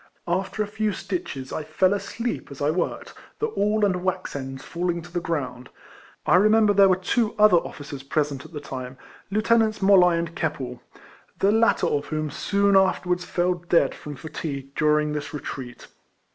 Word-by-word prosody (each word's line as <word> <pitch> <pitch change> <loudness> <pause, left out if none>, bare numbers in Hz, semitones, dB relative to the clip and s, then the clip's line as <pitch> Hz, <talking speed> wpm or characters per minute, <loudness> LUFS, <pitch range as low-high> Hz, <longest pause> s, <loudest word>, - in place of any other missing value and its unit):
After 190 +4 -1
a - - -6
few 215 0 -1
stitches, 140 -10 -5
I 155 - -3
fell 180 +5 +2
asleep 230 +3 -4
as 140 - -10
I 145 +1 +2
worked, 180 - -3 0.2
the 450 - -1
awl 210 - +1
and 180 -2 0
wax 185 -3 -2
ends 135 -1 -6
falling 170 -1 -2
to 175 - -13
the 175 - -1
ground. 130 -7 -4 0.6
I - - +5
remember 215 +1 +5
there 200 -1 +6
were 185 - +5
two 210 +5 0
other 210 -4 +6
officers 145 -4 -5
present 140 -1 -1
at - - -13
the 150 - -6
time, 130 -2 -7 0.3
Lieutenants 220 +1 +2
MoUoy 185 -3 +5
and 170 0 -3
Keppel, 130 -6 -3 0.6
the 195 - +3
latter 225 -4 +3
of 145 -3 0
whom 155 -1 -2
soon 200 0 +1
afterwards 180 -2 +2
fell 180 +1 +1
dead 170 -5 +1
from 150 -1 -8
fatigue 140 -2 -6
during 150 0 +2
this 150 +1 -4
retreat. 130 -3 -7
175 Hz, 175 wpm, -24 LUFS, 145-200 Hz, 0.6 s, there